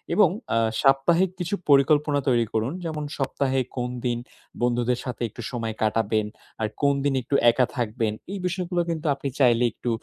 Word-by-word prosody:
এবং 195 -3 +6 0.3
আ - - +3 0.2
সাপ্তাহিক 165 +7 +4
কিছু 175 +3 -1
পরিকল্পনা 145 +1 +4
তৈরি 120 -2 +3
করুন। 115 +6 0
যেমন 155 -2 -3
সপ্তাহে 135 -1 0 0.2
কোন 125 0 -1 0.2
দিন 120 -1 +1 0.4
বন্ধুদের 120 0 +1
সাথে 125 -2 -5
একটু 120 - -10
সময় 115 -3 -3
কাটাবেন, 110 0 +1 0.4
আর 110 - +1
কোন 140 -1 +4
দিন 140 -1 +1
একটু 140 - -2 0.2
একা 125 +2 +2
থাকবেন। 115 -2 -1 0.2
এই 200 - -4
বিষয়গুলো 180 -1 -1
কিন্তু 165 -1 -3
আপনি 140 - -5
চাইলে 120 -3 +4
একটু 120 - -5
130 Hz, 170 wpm, -25 LUFS, 120-150 Hz, 0.4 s, এবং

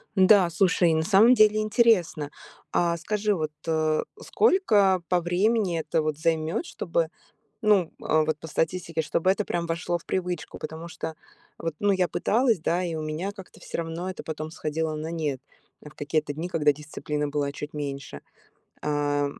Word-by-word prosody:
Да, 190 -2 +6
слушай, 175 -1 +3
на 160 - +1
самом 210 +7 +6
деле 215 -2 +5
интересно. 215 - +2 0.4
А 170 -1 +1
скажи, 210 +4 0
вот, 155 -3 -2 0.2
а, 155 -1 +1 0.2
сколько 210 - +3
по 180 -1 +2
времени 185 +1 +1
это 160 +1 0
вот 155 -1 -2
займет, 160 - 0
чтобы, - - -1 0.5
ну, 205 -5 +4 0.2
э, 155 0 +2
вот 155 -1 -1
по 160 - -9
статистике, 165 0 -1
чтобы 170 +4 +1
это 205 +2 +1
прям 170 -2 -2
вошло 170 +1 -1
в - - -20
привычку? 180 -3 -3
Потому 160 +2 -7
что 160 -1 -6 0.4
вот, 165 -2 -3
ну, 205 -1 +3
я 185 -2 +2
пыталась, 230 +5 +2
да, 175 +3 0
и 170 -2 -3
у 155 - -3
меня 155 +6 -3
как-то 195 -3 -13
всё - - -6
равно 165 +2 -4
это 185 - -7
потом 155 0 -5
сходило 160 0 -2
на 155 +1 -4
нет 150 -6 -2 0.4
в 150 - -11
какие-то 150 0 -1
дни, 165 +4 -4
когда 150 -4 +3
дисциплины 150 0 -4
была 145 -1 -1
чуть 150 +1 -7
меньше, 140 - -5 0.6
ам. 145 -1 -1
165 Hz, 170 wpm, -26 LUFS, 155-190 Hz, 0.6 s, Да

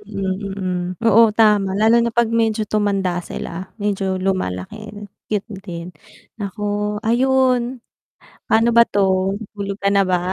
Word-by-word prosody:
Mm, 195 -2 -3
mm, 190 -2 -3 0.3
oo 225 0 +6
tama 210 -3 +4
lalo 225 +2 +5
na 235 - +1
'pag 235 0 +1
medyo 225 -1 +1
tumanda 200 -4 0
sila, 175 +1 -7
medyo 195 -3 -1
lumalaki, 185 - -3 0.4
cute 210 0 -2
din. 170 -3 -7 0.5
Nako, 205 +1 -2
ayun, 255 +1 +2 0.7
pano 225 +2 +3
ba 235 0 +6
'to, 190 -1 +1 0.2
tulog 200 -1 -5
ka 200 - +2
na 200 -1 +3
ba? 180 -1 +1
205 Hz, 135 wpm, -20 LUFS, 190-225 Hz, 0.7 s, oo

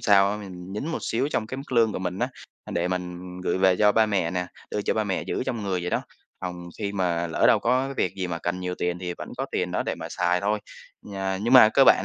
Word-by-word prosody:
sao 100 -2 +5
á 105 - -2
mình 95 -3 -8
nhín 105 +8 -3
một 165 - -2
xíu 130 +5 0
trong 110 - -1
cái 130 +4 -5
mức 135 0 -8
lương 115 -3 +4
của - - -3
mình 90 0 -3
á, 125 +2 0 0.4
a, - - -9
để 85 +1 0
mình 90 -1 -3 0.2
gửi 90 0 0
về 95 -1 +4
cho 105 +1 +5
ba 110 0 +4
mẹ 95 -5 0
nè, 90 0 -2 0.2
đưa 105 - -1
cho - - 0
ba 110 - +1
mẹ 95 -2 -1
giữ - - -2
trong 115 -3 -2
người 95 -2 -1
vậy 90 0 -3
đó, - - 0 0.4
phòng 90 -1 -5
khi 100 -2 -2
mà 85 -3 0
lỡ 80 - 0
đâu - - +6
có 130 +2 +2
cái 135 - -5
việc 90 - 0
gì 95 -2 -2
mà 85 -2 -3
cần 90 +2 -2
nhiều 90 0 -2
tiền 90 0 -2
thì 90 -1 -4
vẫn - - -6
có - - -2
tiền - - 0
đó - - 0
để - - -2
mà - - -7
xài 90 +1 +1
thôi. 105 +2 +1 0.4
Nhà 95 -2 -3
nhưng 120 +3 +1
mà 125 -4 +10
cơ 135 +4 +5
bản - - +6
95 Hz, 290 wpm, -25 LUFS, 90-110 Hz, 0.4 s, mà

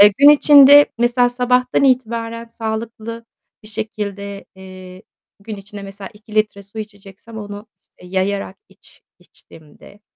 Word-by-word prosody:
Eee, 205 0 +8
gün 285 +1 +8
içinde 290 -1 +7
mesela 245 +1 +2
sabahtan 250 +1 0
itibaren 230 -3 -1
sağlıklı 230 0 -6 0.4
bir 210 - -14
şekilde, 205 -2 -6
eee, 185 0 -13 0.4
gün 210 +1 -8
içinde 200 +1 -11
mesela 195 +1 -10
2 210 0 -16
litre 210 -2 0
su 200 +3 -13
içeceksem 210 +1 -11
onu 205 +1 -9 0.2
işte 180 - -19
yayarak 190 +1 -3
iç - - -20 0.2
içtiğimde, 160 +6 -19
215 Hz, 130 wpm, -18 LUFS, 200-230 Hz, 0.4 s, Eee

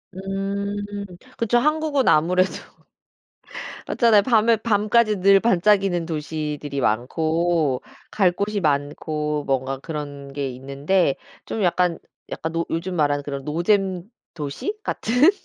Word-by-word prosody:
음 195 +1 -3 0.6
그쵸. 230 +1 +2
한국은 300 0 +1
아무래도 180 +4 +4 1.4
맞잖아요. 225 -4 +4
밤에 230 -1 +4
밤까지 215 0 +2
늘 195 +1 +6
반짝이는 195 -4 +2
도시들이 150 -3 -4
많고 155 +5 0 0.3
갈 185 -4 +3
곳이 205 +3 -2
많고 150 0 -1
뭔가 135 0 -1
그런 145 -1 -7
게 140 -1 -3
있는데 140 +6 0 0.3
좀 220 - -3
약간 180 -1 +2 0.3
약간 160 - -4
노 165 0 -1
요즘 180 +3 -2
말하는 145 -2 +1
그런 140 -1 -5
노잼 180 +3 +1 0.3
도시 155 - -4
같은 250 - +3
175 Hz, 240 characters per minute, -23 LUFS, 145-205 Hz, 1.4 s, 늘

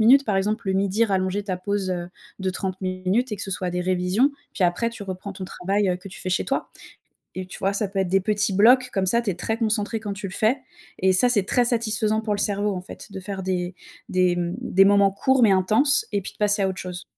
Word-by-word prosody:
minutes, 265 +5 +6
par 205 -3 0
exemple, 210 +2 -1
le - - +2
midi, 200 +3 +2
rallonger 190 0 0
ta 185 -3 -2
pause, 195 0 -2
heu, 175 -1 -3 0.3
de 190 0 -1
30 185 0 -4
minutes 185 +6 -1
et - - -2
que 205 - -5
ce 195 - -5
soit 185 -1 -2
des 180 0 -2
révisions, 185 +8 +2 0.2
puis, 185 - 0
après, 205 +7 +1
tu 225 -3 -9
reprends 190 +1 -6
ton 190 0 -7
travail, 195 +2 -1
heu, 180 - +1
que 190 +2 -11
tu - - -11
fais 185 - -3
chez 180 - +1
toi. 270 - -2 0.7
Et, 185 - -4
tu 185 - -10
vois, 195 +1 0
ça 200 0 0
peut 195 -1 -2
être 190 - +1
des 195 0 +3
petits 205 -1 0
blocs 250 +5 +5
comme 190 -1 +1
ça, 235 +5 +2
tu 220 - -2
es - - -6
très 220 +5 -2
concentré 220 -1 0
quand 205 -2 -4
tu 195 0 -6
le 190 - -8
fais 225 +5 +2 0.4
et 190 0 +3
ça, 220 +7 +5
c'est 205 -5 +2
très 245 +4 +2
satisfaisant 220 -2 0
pour 215 -2 -1
le - - -5
cerveau, 205 0 0
en 180 - -4
fait, 190 - -11
de 190 - -6
faire 190 0 -6
des 180 -1 -2 0.3
des, 180 -1 +2
mmh, 175 +1 -2
des 195 -5 +4
moments 200 -1 +5
courts 260 +5 +2
mais 205 - +6
intenses, 220 +10 +3
et 200 - +1
puis - - -7
de - - -27
passer 205 -1 +2
à 190 - +2
autre 185 - -5
chose. 180 -1 -6
195 Hz, 265 wpm, -24 LUFS, 185-215 Hz, 0.7 s, minutes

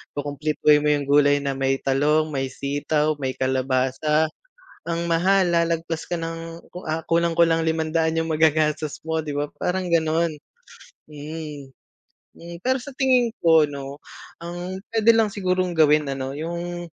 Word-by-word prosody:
kukumpletuhin 150 +1 +2
mo 150 - -1
yung 145 - -2
gulay 145 0 +3
na 140 - -1
may 135 0 0
talong, 150 +3 +2
may 135 -1 -2
sitaw, 145 +3 -1
may 130 -2 -3
kalabasa 130 +4 0 0.6
ang 170 0 -1
mahal, 180 +2 +2
lalagpas 165 -1 -1
ka 175 - 0
ng 165 0 -6
ku 180 - -6
ah, 160 +1 -2
kulang-kulang 165 0 +2
₱500 160 0 0
yung 160 - -2
magagastos 155 -1 +1
mo 160 0 0
di 150 - -6
ba? 145 0 0 0.2
Parang 185 +1 -1
ganon 165 -1 +1 0.7
mm. 150 -1 -8 0.7
Hmm, 170 0 -10
pero 260 +6 +1
sa 280 - -8
tingin 255 -3 +2
ko 160 -2 +5
'no, 140 0 -6 0.4
ang 175 +2 -6
puwede 225 0 +5
lang 220 -2 +2
sigurong 185 -2 0
gawin 155 -2 +4
ano 135 0 -4
yung, 170 +3 -5
160 Hz, 145 wpm, -23 LUFS, 145-170 Hz, 0.7 s, ko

